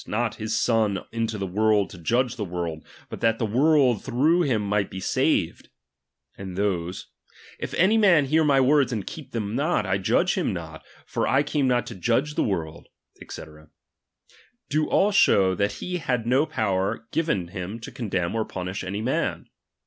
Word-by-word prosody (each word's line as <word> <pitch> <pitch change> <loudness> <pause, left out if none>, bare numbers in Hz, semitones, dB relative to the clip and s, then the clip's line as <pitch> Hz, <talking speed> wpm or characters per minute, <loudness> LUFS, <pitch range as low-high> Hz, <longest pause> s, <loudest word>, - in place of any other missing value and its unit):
iot 115 +1 -1
his 110 0 -2
Son 110 -5 +1
into 115 -1 -2
the 100 - -3
world, 105 +2 +1
to - - -10
judge 120 +8 0
the 110 - -4
world, 85 -4 -4 0.2
but - - -8
that 115 -1 +2
the 115 - -1
world 130 0 +3
through 155 +8 +2
him 130 -9 +1
might 105 0 0
be 95 - -7
saved; - - 0 0.7
and 95 -2 -8
those: 95 -3 -2 0.5
If - - -5
any 210 +5 +4
man 175 -9 +5
hear 155 +4 +2
my 140 -3 +4
words, 135 0 +3
and 110 -5 -3
keep 155 -4 -9
them 110 -2 -3
not, 145 -4 +1
I 95 +1 0
judge 95 - +2
him - - -1
not; - - -7 0.2
for - - -2
I 135 +2 +3
came 145 -2 0
?iot 120 -3 +1
to - - -7
judge 115 +9 0
the - - 0
world, 85 -5 -3 0.4
&c.: - - -7 1.3
do 155 +1 +1
all 205 +2 +3
show, 95 - +4
that 100 +3 0
he 180 0 -4
had 125 -8 -2
no 130 +6 +2
power 100 -7 -1
given 105 - -1
him 95 +4 -6
to 140 - -8
condemn 95 -8 -2
or 115 -1 0
punish 95 -1 -5
»ny 100 +3 -4
man. 125 +4 -2
115 Hz, 180 wpm, -25 LUFS, 95-135 Hz, 1.3 s, man